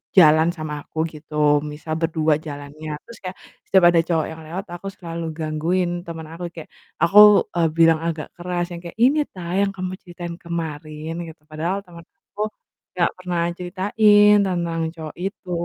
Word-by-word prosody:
jalan 160 Hz, -2 st, +7 dB
sama 150 Hz, -2 st, -6 dB
aku 160 Hz, 0 st, -1 dB, 0.2 s
gitu, 150 Hz, -1 st, +2 dB
misal 150 Hz, +1 st, -6 dB
berdua 160 Hz, -2 st, +1 dB
jalannya. 150 Hz, 0 st, -7 dB
Terus 235 Hz, -, -13 dB
kayak 185 Hz, +1 st, -6 dB, 0.3 s
setiap 190 Hz, -2 st, +5 dB
ada 170 Hz, -, +4 dB
cowok 165 Hz, -2 st, 0 dB
yang 160 Hz, -, -9 dB
lewat 180 Hz, +5 st, -5 dB
aku 175 Hz, +3 st, -7 dB
selalu 170 Hz, -1 st, -6 dB
gangguin 165 Hz, +3 st, 0 dB, 0.2 s
temen 165 Hz, -1 st, -6 dB
aku, 175 Hz, +1 st, -5 dB
kayak 160 Hz, -, -9 dB, 0.3 s
aku, 205 Hz, +4 st, +8 dB
eee, 170 Hz, -2 st, +2 dB
bilang 165 Hz, -1 st, +5 dB
agak 165 Hz, -2 st, -4 dB
keras 175 Hz, 0 st, -3 dB
yang 170 Hz, -, -6 dB
kayak, 170 Hz, -, -8 dB
"Ini 260 Hz, +7 st, +4 dB
ta, 175 Hz, -2 st, -7 dB
yang 200 Hz, -, +3 dB
kamu 185 Hz, -1 st, -4 dB
ceritain 175 Hz, -1 st, -7 dB
kemarin?" 160 Hz, -2 st, -5 dB
Gitu, 160 Hz, -1 st, -12 dB
padahal 165 Hz, +6 st, -3 dB
temen 170 Hz, -3 st, -13 dB
aku 210 Hz, +1 st, -6 dB, 0.5 s
enggak 170 Hz, -1 st, +2 dB
pernah 180 Hz, -2 st, -2 dB, 0.2 s
ceritain 205 Hz, +3 st, +4 dB
tentang 170 Hz, -2 st, -1 dB
cowok 155 Hz, -2 st, -8 dB
itu. 190 Hz, 0 st, -5 dB
170 Hz, 165 wpm, -22 LUFS, 155-180 Hz, 0.5 s, aku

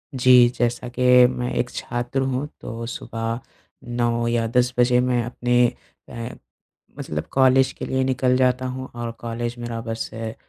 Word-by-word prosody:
जी, 125 Hz, -1 st, +6 dB
जैसा 120 Hz, 0 st, -2 dB
कि 125 Hz, +1 st, -6 dB, 0.3 s
मैं 125 Hz, -1 st, -3 dB
एक 120 Hz, -, -1 dB
छात्र 120 Hz, +2 st, -3 dB
हूँ, 130 Hz, +2 st, -1 dB
तो 115 Hz, +1 st, -6 dB
सुबह 115 Hz, 0 st, -4 dB, 0.6 s
9 120 Hz, -1 st, +1 dB
या 115 Hz, -1 st, +1 dB
10 125 Hz, +2 st, +1 dB
बजे 125 Hz, 0 st, +4 dB
मैं 125 Hz, -1 st, +1 dB
अपने 120 Hz, +1 st, +2 dB, 0.4 s
अ, 115 Hz, 0 st, -6 dB, 0.7 s
मतलब 75 Hz, 0 st, -4 dB
कॉलेज 130 Hz, 0 st, +4 dB
के -, -, -6 dB
लिए 130 Hz, 0 st, 0 dB
निकल 130 Hz, -1 st, +1 dB
जाता 130 Hz, 0 st, +2 dB
हूँ 130 Hz, +1 st, -6 dB
और 120 Hz, -1 st, -4 dB
कॉलेज 120 Hz, +1 st, -4 dB
मेरा 120 Hz, -1 st, -4 dB
बस 115 Hz, 0 st, -4 dB
है, 115 Hz, 0 st, -5 dB
120 Hz, 160 wpm, -22 LUFS, 115-125 Hz, 0.7 s, जी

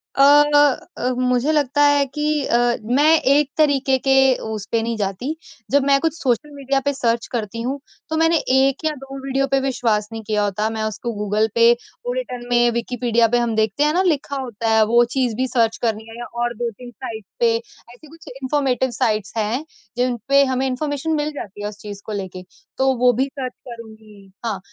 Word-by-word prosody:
अ 275 Hz, -, +4 dB, 0.8 s
अ, 250 Hz, -, 0 dB
मुझे 250 Hz, +3 st, +1 dB
लगता 290 Hz, -1 st, +2 dB
है 285 Hz, -1 st, +3 dB
कि 295 Hz, +3 st, -5 dB, 0.2 s
अ, 235 Hz, -, +2 dB, 0.3 s
मैं 285 Hz, +8 st, +4 dB, 0.2 s
एक 290 Hz, -1 st, +2 dB
तरीके 275 Hz, -3 st, +3 dB
के 270 Hz, -, +5 dB, 0.4 s
उस 210 Hz, -2 st, -5 dB
पे 230 Hz, -1 st, +2 dB
नहीं 230 Hz, 0 st, -2 dB
जाती। 205 Hz, +10 st, -3 dB, 0.4 s
जब 285 Hz, -1 st, +4 dB
मैं 275 Hz, 0 st, +5 dB
कुछ 325 Hz, -1 st, 0 dB
सोशल 280 Hz, +1 st, -1 dB
मीडिया 275 Hz, 0 st, 0 dB
पे 285 Hz, -, +1 dB
सर्च 235 Hz, -3 st, -1 dB
करती 230 Hz, -1 st, -3 dB
हूँ 270 Hz, +4 st, -3 dB, 0.3 s
तो 315 Hz, -, -1 dB
मैंने 325 Hz, 0 st, +3 dB, 0.2 s
1 270 Hz, +3 st, +2 dB
या 310 Hz, -, +2 dB
2 270 Hz, 0 st, -8 dB
वीडियो 275 Hz, 0 st, 0 dB
पे 270 Hz, -, +3 dB
विश्वास 230 Hz, -5 st, 0 dB
नहीं 225 Hz, -1 st, -6 dB
किया 210 Hz, -1 st, 0 dB
होता। 210 Hz, +2 st, -1 dB
मैं 220 Hz, -1 st, -3 dB
उसको 220 Hz, +2 st, -3 dB
गूगल 210 Hz, +1 st, +1 dB
पे, 235 Hz, 0 st, +6 dB, 0.3 s
वो -, -, -1 dB
रिटन 250 Hz, -, -5 dB
में 240 Hz, 0 st, +4 dB
विकिपीडिया 235 Hz, -1 st, +1 dB
पे 240 Hz, +2 st, +1 dB
हम 235 Hz, -2 st, 0 dB
देखते 220 Hz, +6 st, +1 dB
हैं 300 Hz, +1 st, +2 dB
ना 365 Hz, -, +2 dB
लिखा 290 Hz, -5 st, 0 dB
होता 230 Hz, -2 st, -3 dB
है 220 Hz, 0 st, +5 dB
वो 235 Hz, +2 st, +4 dB
चीज़ 250 Hz, -4 st, +1 dB
भी 260 Hz, +2 st, -1 dB
सर्च 230 Hz, -3 st, +1 dB
करनी 220 Hz, -2 st, -1 dB
है 225 Hz, -, -10 dB
या 240 Hz, -, -6 dB, 0.2 s
और 240 Hz, 0 st, 0 dB
2-3 240 Hz, +1 st, -5 dB
साइट्स 220 Hz, -3 st, -8 dB
पे, 230 Hz, -1 st, +3 dB
ऐसे 240 Hz, +4 st, -15 dB
कुछ 325 Hz, +2 st, -17 dB
इन्फॉर्मेटिव 260 Hz, -2 st, 0 dB
साइट्स 215 Hz, -4 st, -1 dB
हैं 225 Hz, +7 st, -1 dB, 0.3 s
जिन 245 Hz, -1 st, 0 dB
पे 280 Hz, 0 st, +6 dB
हमें 260 Hz, 0 st, -1 dB
इन्फॉर्मेशन 290 Hz, +4 st, -2 dB
मिल 300 Hz, 0 st, -1 dB
जाती 205 Hz, -6 st, -8 dB
है -, -, -2 dB
उस 210 Hz, -, -12 dB
चीज़ 205 Hz, -1 st, -8 dB
को 215 Hz, -, -6 dB
लेके, 185 Hz, -2 st, -6 dB, 0.3 s
तो 265 Hz, 0 st, +3 dB
वो 245 Hz, +1 st, +5 dB
भी 260 Hz, +4 st, +1 dB
सर्च 265 Hz, -2 st, -6 dB, 0.2 s
करुँगी। 220 Hz, -4 st, -13 dB
हाँ, 210 Hz, -5 st, -2 dB
245 Hz, 205 wpm, -20 LUFS, 220-275 Hz, 0.8 s, पे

